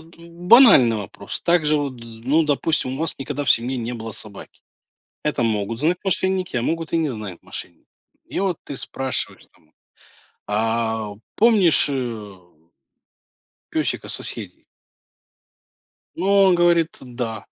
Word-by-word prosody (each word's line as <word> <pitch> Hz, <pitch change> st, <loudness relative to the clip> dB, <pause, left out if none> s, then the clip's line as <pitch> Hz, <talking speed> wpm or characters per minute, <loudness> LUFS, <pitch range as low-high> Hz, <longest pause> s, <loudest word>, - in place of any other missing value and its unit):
банальный 170 Hz, -, +5 dB
вопрос. 100 Hz, -1 st, -6 dB
Также, 160 Hz, -3 st, +3 dB
вот 140 Hz, -3 st, -2 dB
ну, 115 Hz, +7 st, -1 dB
допустим, 145 Hz, -2 st, 0 dB
у 135 Hz, -, -5 dB
вас 165 Hz, -, -1 dB
никогда 145 Hz, +2 st, -4 dB
в 130 Hz, -, +1 dB
семье 125 Hz, +3 st, +3 dB
не 120 Hz, 0 st, -4 dB
было 115 Hz, -1 st, -6 dB
собаки. 100 Hz, -1 st, -10 dB, 0.6 s
Это 150 Hz, -5 st, 0 dB
могут 110 Hz, +1 st, -1 dB
знать 170 Hz, +4 st, +1 dB
мошенники, 190 Hz, -3 st, 0 dB
а 120 Hz, -, +1 dB
могут 165 Hz, +5 st, -2 dB
и -, -, +3 dB
не 160 Hz, -3 st, 0 dB
знать 105 Hz, -7 st, -7 dB
мошенники. -, -, -8 dB, 0.4 s
И -, -, -4 dB
вот 190 Hz, -4 st, 0 dB
ты 140 Hz, -, -7 dB
спрашиваешь 130 Hz, -1 st, -3 dB
там: 75 Hz, -, -29 dB, 0.7 s
"А 110 Hz, 0 st, -1 dB, 0.2 s
помнишь, 210 Hz, -7 st, +4 dB
э" 115 Hz, -7 st, -4 dB, 1.4 s
песика -, -, -1 dB
соседей? -, -, -5 dB, 1.5 s
Ну, 175 Hz, -, -4 dB, 0.2 s
он 185 Hz, -2 st, +5 dB
говорит: 170 Hz, -2 st, +3 dB
"Да". 120 Hz, -4 st, -6 dB
135 Hz, 130 wpm, -22 LUFS, 115-165 Hz, 1.5 s, банальный